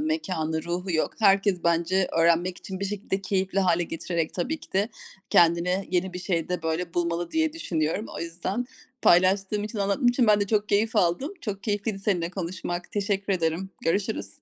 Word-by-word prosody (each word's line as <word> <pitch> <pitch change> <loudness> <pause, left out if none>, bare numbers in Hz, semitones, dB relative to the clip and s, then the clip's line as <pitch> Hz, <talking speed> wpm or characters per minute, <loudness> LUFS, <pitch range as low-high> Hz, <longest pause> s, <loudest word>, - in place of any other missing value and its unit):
mekânı, 185 - -1
ruhu 180 +2 -3
yok. 160 - +1
Herkes 195 -3 +3
bence 170 +3 +2
öğrenmek 170 +2 +3
için 190 0 -7
bir - - -1
şekilde 200 -1 -3
-keyifli 195 0 -1
hâle 175 -2 +3
getirerek 165 0 -3
tabii 305 - -2
ki - - -15
de 200 +4 +2 0.4
kendine 175 +3 +3
yeni 185 0 0
bir 180 - -5
şey 175 -3 -1
de, 180 -2 -2
böyle, 165 +1 -2
bulmalı 170 0 -1
diye 320 -1 +1
düşünüyorum. 175 - -2
O - - -5
yüzden 180 +8 -3 0.4
paylaştığım 195 +3 +4
için, 215 0 -5
anlattığım 200 +6 +2
için 245 -1 +3
ben 210 -1 +5
de 200 - +1
çok 210 0 +1
keyif 220 +3 +2
aldım. 205 - +1
Çok 200 -3 -5
keyifliydi 205 -1 -1
seninle 180 -4 0
konuşmak. 175 -1 -5
Teşekkür 200 -1 0
ederim. 170 +2 -1
Görüşürüz. 200 +6 0
190 Hz, 175 wpm, -26 LUFS, 170-205 Hz, 0.4 s, ben